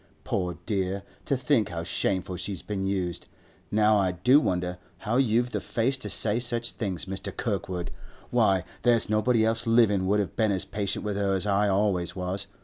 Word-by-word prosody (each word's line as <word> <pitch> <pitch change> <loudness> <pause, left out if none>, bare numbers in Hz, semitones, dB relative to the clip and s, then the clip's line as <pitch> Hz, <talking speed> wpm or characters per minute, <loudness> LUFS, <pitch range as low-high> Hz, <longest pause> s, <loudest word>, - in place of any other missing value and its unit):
Poor 90 -3 -2
dear! 95 -1 -1 0.2
to 140 - +1
think 125 -4 +2
how 85 -2 -4
shameful 95 +1 -1
she's 90 0 -4
been 95 -2 -3
used! 90 -3 -2 0.4
Now 105 0 +4
I 95 -2 +1
do 125 +11 +5
wonder 90 -7 -1 0.2
how 115 +3 -1
you've 120 -1 +2
the - - -1
face 120 +4 0
to - - -5
say 110 +1 +1
such 120 -1 -1
things, 95 -6 -4
Mr. 95 0 -5
Kirkwood! 95 -5 -3 0.4
Why, 95 -2 +3 0.2
there's 120 -3 +3
nobody 110 +1 +3
else 115 +1 0
livin' 105 -5 +4
would 105 +2 +3
have 100 - -2
been 110 -2 +2
as 95 -2 0
patient 100 0 -3
with 105 -1 -2
her 100 -1 +1
as 95 - -1
I 100 0 +2
always 95 -3 +1
was. 95 +1 -3
100 Hz, 185 wpm, -27 LUFS, 95-115 Hz, 0.4 s, do